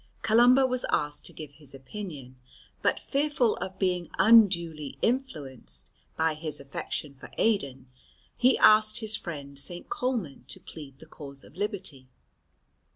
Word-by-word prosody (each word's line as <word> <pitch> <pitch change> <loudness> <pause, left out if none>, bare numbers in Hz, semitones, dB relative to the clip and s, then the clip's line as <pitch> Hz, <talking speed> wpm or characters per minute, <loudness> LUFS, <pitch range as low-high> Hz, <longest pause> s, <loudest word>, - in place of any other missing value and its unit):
Columba 245 +4 +5
was 255 -1 0
asked 150 0 0
to - - -9
give 155 -3 -9
his 145 -2 -6
opinion, 135 -4 -9 0.4
but - - +1
fearful 280 -5 +1
of 190 0 -6
being 180 -3 -1
unduly 175 -9 +4
influenced 140 - -2 0.3
by 160 0 +2
his 155 0 -1
affection 140 +1 -4
for 130 - -12
Aidan, 140 - 0 0.5
he 255 +1 +5
asked 215 +1 +6
his 220 -2 +2
friend 140 -5 -6
St. 175 +4 -6
Colman 250 - -3
to - - -1
plead 140 -4 -11
the - - -14
cause 140 -2 -11
of - - -17
liberty. 190 -10 -3
170 Hz, 140 wpm, -28 LUFS, 140-220 Hz, 0.5 s, asked